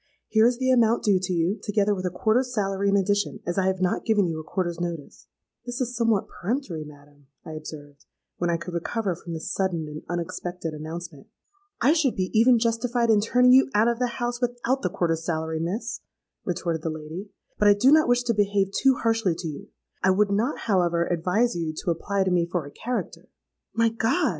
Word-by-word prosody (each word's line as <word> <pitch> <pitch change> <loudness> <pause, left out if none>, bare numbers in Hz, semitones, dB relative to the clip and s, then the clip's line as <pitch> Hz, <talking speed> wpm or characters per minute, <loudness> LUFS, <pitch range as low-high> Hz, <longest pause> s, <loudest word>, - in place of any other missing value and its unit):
Here 220 +1 +5
is 245 0 +1
the 260 0 +1
amount 235 -2 +3
due 200 -3 +3
to 185 0 -3
you, 175 +4 0
together 205 -1 +1
with 185 -2 -2
a - - 0
quarter's 230 +7 +1
salary 195 -1 0
in 200 - +3
addition, 205 +2 0
as 175 +2 -1
I 190 - +1
have 190 -1 -1
not 185 - 0
given 210 -3 +2
you 165 -2 -3
a - - -7
quarter's 175 0 -3
notice.'—'This 175 - -8
is 250 -1 -2
somewhat 230 -4 +1
peremptory, 200 - -3
madam,' 145 -1 -16 0.2
I - - -7
observed, 150 -2 -10 0.3
when 175 - -1
I 170 - +1
could 170 +1 -8
recover 190 +3 -2
from 170 0 -8
this 160 - -5
sudden 175 -5 -1
and 150 0 -7
unexpected 175 -1 -4
announcement.—'I 175 - -4
should 310 -7 +1
be 185 -1 -2
even 235 +2 +5
justified 230 +1 +1
in 210 -2 +4
turning 250 +3 +4
you 265 +1 +6
out 215 +2 +4
of 235 0 0
the 250 - +1
house, 240 0 -2
without 245 +2 -1
the 180 - 0
quarter's 165 -2 -1
salary, 160 -1 -2
Miss,' 210 +9 -3 0.5
retorted 170 -2 -2
the 165 - -2
lady: 160 +6 -7 0.3
'but 210 - +4
I 205 - +7
do 250 +7 +4
not 310 -2 +5
wish 245 0 +3
to 240 -1 +1
behave 200 -2 +1
too 265 +5 +3
harshly 225 -7 +1
to 170 - -5
you; 150 -2 -7 0.3
I 190 - +3
would 200 +2 +3
not, 225 +8 0
however, 175 -5 +1
advise 180 +8 +1
you 160 -2 -3
to 175 - +2
apply 195 +3 -1
to 190 - 0
me 175 -1 +2
for 175 -5 -1
a 145 - -10
character.'—'My 230 0 -4
God!' 225 +3 +1
195 Hz, 205 wpm, -25 LUFS, 170-230 Hz, 0.5 s, I